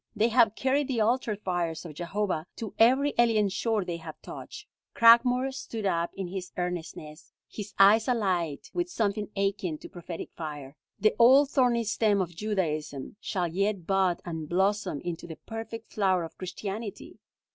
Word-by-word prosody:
They 220 +2 +3
have 230 -2 +4
carried 270 +2 +1
the 250 -4 -1
altar 225 0 +1
fires 175 -4 -3
of 160 - -8
Jehovah 175 0 -2
to 220 -3 -6
every 265 +5 +5
alien 220 -4 +4
shore 215 0 -1
they 175 -1 -3
have 160 -2 -10
touched." - - -9 0.3
Cragmore 245 +3 +6
stood 225 -5 -5
up 170 -3 +1
in 195 - -4
his 185 -1 -6
earnestness, 170 -3 -5 0.2
his 205 -2 -8
eyes 210 +3 +6
alight 185 - -1
with 355 0 -1
something 210 - -1
akin 195 -5 -1
to - - -11
prophetic 175 -1 -7
fire. 145 -4 -7 0.2
"The 215 - +3
old 270 +4 +6
thorny 245 -3 +3
stem 215 -1 +2
of 175 -3 -2
Judaism 165 -7 -3
shall 180 -5 -2
yet 195 +1 -1
bud 190 -2 +1
and 160 -3 -5
blossom 190 -4 0
into 170 -1 -5
the 160 - -7
perfect 225 +2 -8
flower 190 -4 +2
of 165 - -8
Christianity!" 200 +3 -6
200 Hz, 160 wpm, -28 LUFS, 175-225 Hz, 0.3 s, Cragmore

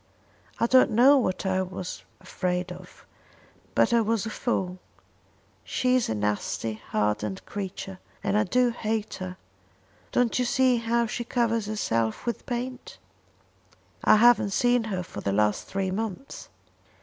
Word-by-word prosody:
I - - +3
don't 255 +2 +5
know 255 +6 +6
what 185 -5 -1
I 190 0 +1
was 185 -1 -5 0.2
afraid 180 -1 -2
of, 180 0 -12 0.7
but - - +3
I 235 - +5
was 225 -1 0
a 220 - -4
fool. 185 -7 -2 0.8
She 255 0 +1
is 255 - +1
a 110 - 0
nasty 105 +1 -1 0.2
hardened 105 -2 -1
creature, 190 -1 -6 0.2
and 200 0 0
I 210 - +4
do 245 +5 +2
hate 220 -2 -2
her. 185 -1 -6 0.7
Don't 245 0 +2
you 250 - +2
see 255 0 +3
how 235 +1 +1
she 235 +2 -3
covers 230 -3 0
herself 115 - -1
with 235 - -3
paint?" 250 +1 -5 1.1
"I - - +7
haven't 225 -3 +5
seen 245 0 +2
her 190 -4 -3
for 105 - -8
the 100 - -1
last 105 +1 +1
three 195 -1 -2
months." 220 +4 -5
210 Hz, 150 wpm, -26 LUFS, 180-240 Hz, 1.1 s, I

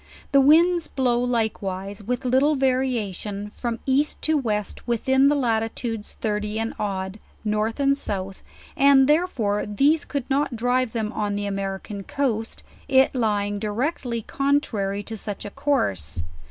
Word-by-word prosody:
The 275 -1 +6
winds 330 +4 +5
blow 250 -3 +1
likewise, 205 -5 -2
with 245 +5 -3
little 265 +4 +3
va 265 -1 +3
riation, 210 -5 -3
from 235 -2 -3
east 275 +3 +1
to 315 - +3
west 215 -6 -2
with 235 0 -1
in 265 +1 +5
the 295 - +3
latitudes 225 -3 -2
thirty 210 -1 -2
and 225 +1 -2
odd, 190 0 -3 0.3
north 215 +3 0
and 275 0 +3
south; 195 -7 -4 0.3
and 275 -1 +6
therefore 275 - +1
these 280 +9 +3
could 280 -4 -4
not 275 -2 0
drive 245 +1 +1
them 220 -2 -2
on 205 -1 -1
the 205 0 -2
American 195 +1 -4
coast,, 225 -1 -2 0.2
it 265 -1 +4
lying 205 -4 0
directly 235 +2 -2
contrary 215 -9 0
to 225 - -6
such 205 -1 -5
a 205 - -6
course. 100 - -1
230 Hz, 150 wpm, -24 LUFS, 205-270 Hz, 0.3 s, The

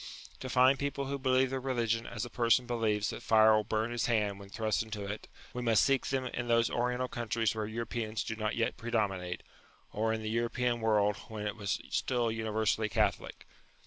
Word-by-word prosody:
To 130 - -6
find 130 +2 +5
people 140 -1 -2
who 140 +1 -3
believe 130 0 +2
their 135 - -1
religion 115 -3 -1
as 115 0 -4
a - - -8
person 120 +1 +3
believes 110 -4 0
that - - -7
fire 110 0 +6
will 110 - +2
burn 110 +2 -1
his 120 -1 -1
hand 105 -4 +1
when 100 0 -11
thrust 110 0 0
into 110 -3 -5
it, 100 +2 -6 0.3
we 125 - -3
must 115 -3 +4
seek 135 -1 +2
them 135 -1 -1
in 120 -1 -4
those 115 0 +3
Oriental 125 +1 0
countries 115 -2 -1
where 110 -1 -3
Europeans 115 -1 -3
do 115 - -4
not 110 0 -2
yet 115 +1 0
predominate, 100 -6 -2 0.5
or 110 +1 0
in 110 0 -2
the 110 - -2
European 120 +1 0
world 105 -2 +2
when 105 -1 -6
it 105 - -2
was 100 -2 -2
still 120 -3 0
universally 110 -1 0
Catholic. - - -1
115 Hz, 200 wpm, -31 LUFS, 110-120 Hz, 0.5 s, fire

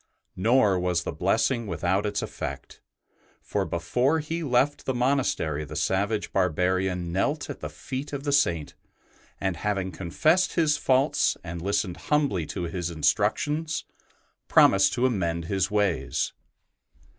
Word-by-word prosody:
Nor 105 -2 +3
was 90 -1 0
the - - -3
blessing 115 -4 0
without 95 +4 0
its 105 0 -2
effect, - - -6 0.6
for - - -2
before 125 - +1
he 160 +2 -3
left 145 0 +1
the 130 - 0
monastery 120 - 0
the 75 - -8
savage 100 +3 0
barbarian 90 0 0
knelt 145 - -1
at - - -8
the - - -5
feet 135 +2 -6
of 140 -1 -4
the 145 - -1
Saint, 85 - +1 0.7
and, 95 -3 -1
having 95 -1 -2
confessed 155 - +1
his 155 -4 +3
faults 135 0 +2
and 85 0 -6
listened 100 -1 -1
humbly 140 - 0
to 90 - -4
his 85 0 -3
instructions, 150 - 0 0.6
promised 95 0 +5
to 125 +1 +1
amend 85 -9 0
his 95 +1 0
ways. 100 -5 0
100 Hz, 135 wpm, -26 LUFS, 90-135 Hz, 0.7 s, promised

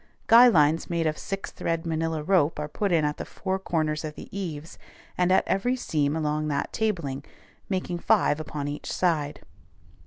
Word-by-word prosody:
Guy 240 +1 +8
lines 160 -6 +3
made 170 -1 0
of 155 -1 +1
six 195 +4 -5
thread 165 -1 -2
manilla 160 -1 -1
rope 170 -5 +3
are 150 0 -3
put 200 +6 -2
in 160 -3 +3
at 150 0 -1
the - - -4
four 190 0 -3
corners 155 -4 -1
of 155 -1 -5
the - - -11
eaves, 165 -5 -6 0.4
and 180 0 +2
at 190 - +3
every 245 +7 +1
seam 150 - -1
along 155 -1 -1
that 145 -1 -2
tabling, 170 -11 -2 0.5
making 185 -2 -2
five 150 - +2
upon 150 -2 -4
each 145 +1 -5
side. 155 -5 0
160 Hz, 180 wpm, -26 LUFS, 150-185 Hz, 0.5 s, Guy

